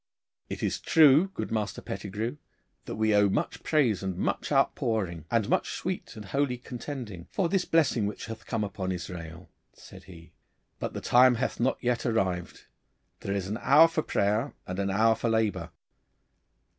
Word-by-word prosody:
'It - - -5
is - - -1
true, 155 +2 +6
good - - -4
Master 110 -2 -2
Pettigrue, 105 +7 -5 0.5
that - - -5
we 110 0 +2
owe 105 -1 +4
much - - -2
praise 130 - +2
and 95 -2 -3
much - - -2
outpouring, 90 -8 0
and 115 -3 +1
much - - 0
sweet - - -4
and 105 - -9
holy 130 +5 0
contending, 120 - -7
for 190 - 0
this 185 +1 0
blessing 135 -10 +2
which 105 - -6
hath 115 -1 -9
come 115 -3 -1
upon 95 -2 -3
Israel,' 85 -1 -7 0.3
said - - -14
he, 85 -3 -14 0.5
'but - - -4
the - - -4
time 125 0 +5
hath 120 - -2
not 125 +3 +1
yet 120 -1 0
arrived. 95 -7 -1 0.5
There 100 - -3
is 95 -2 -2
an 105 +4 -3
hour 155 +4 +7
for 165 -1 -1
prayer 110 +2 0
and 90 +1 -5
an 100 0 0
hour 110 +4 +4
for 115 - -2
labour. 105 -6 0
110 Hz, 170 wpm, -28 LUFS, 95-125 Hz, 0.5 s, hour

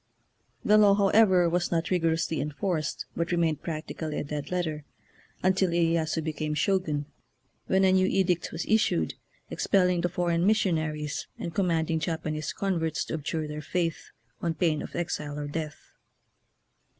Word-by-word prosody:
The 215 0 +6
law, 205 -2 +6
however, 195 -3 +5
was 175 +1 0
not 165 0 0
rigorously 165 -3 +1
en 150 - -2
forced, 165 -2 -2
but 170 +1 -1
remained 165 -4 +1
practically 155 -1 -4
a - - -1
dead 145 0 -5
letter, 160 -4 -2 0.6
until 190 0 +3
Iyeyasu 165 -1 +1
became 155 -1 -2
Shogun, 155 -5 0 0.6
when 190 0 +3
a 190 - +5
new 185 0 +4
edict 180 -3 +1
was 165 - -4
issued, 150 - +2 0.4
expelling 180 -3 +2
the 175 - 0
foreign 175 -1 0
missionaries, 155 -8 0
and 170 - -5
command 165 -4 +1
ing 160 - +1
Japanese 155 -2 -3
converts 165 -5 -1
to - - -6
abjure 155 0 -2
their 150 0 -5
faith 165 +1 -2 0.3
on 165 -1 -1
pain 160 -4 +1
of - - -8
exile 150 -4 -3
or 145 -1 -4
death. 155 0 -6
165 Hz, 150 wpm, -27 LUFS, 155-180 Hz, 0.6 s, The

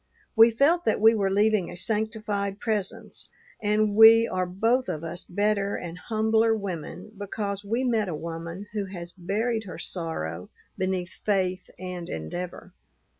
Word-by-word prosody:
We 225 +1 +8
felt 285 +10 +3
that 220 - +2
we 220 +2 +7
were 200 -3 +1
leaving 205 -2 +2
a 175 - -8
sanctified 210 -1 -1
presence, 210 -4 -3 0.3
and 210 0 +2
we 225 +1 +8
are 185 0 -1
both 225 +8 +1
of 155 - -3
us 165 +2 -4
better 205 +1 0
and 170 -1 -6
humbler 220 +1 +2
women 190 0 -6
because 200 0 -4
we 230 +5 -1
met 225 -6 +1
a 165 - -3
woman 170 +4 -6
who 205 -2 -1
has 175 -3 -6
buried 215 +6 -2
her 180 - -8
sorrow 90 - -4 0.3
beneath 185 -2 -3
faith 185 -3 0
and 180 -1 -6
endeavor. 80 - -6
200 Hz, 150 wpm, -26 LUFS, 180-220 Hz, 0.3 s, We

